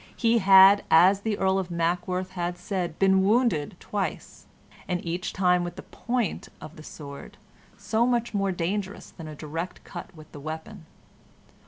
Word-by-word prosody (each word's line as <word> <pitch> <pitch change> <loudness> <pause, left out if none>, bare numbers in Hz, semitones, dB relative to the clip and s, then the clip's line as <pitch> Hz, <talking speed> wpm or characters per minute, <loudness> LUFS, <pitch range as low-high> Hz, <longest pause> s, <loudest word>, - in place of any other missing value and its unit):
He 230 0 +2
had, 195 0 +7
as 185 +5 +6
the 215 -1 -2
Earl 190 0 +1
of 185 -2 -4
Mackworth 175 +2 -2
had 175 -1 -3
said, 180 -2 -4
been 190 -1 +4
wounded 210 - +1
twice, 205 -2 -5 0.4
and 180 -1 -1
each 175 +2 -3
time 180 -2 +2
with 175 - -5
the - - -9
point 240 -5 -3
of 155 - -11
the 155 - -12
sword, 140 -2 -10 0.4
so 230 +2 0
much 235 -2 0
more 195 -1 0
dangerous 190 +3 -4
than 165 -3 -10
a 155 - -8
direct 165 +4 -6
cut 190 - -9
with 155 -1 -14
the 145 - -10
weapon. 160 +4 -8
185 Hz, 165 wpm, -26 LUFS, 170-200 Hz, 0.4 s, had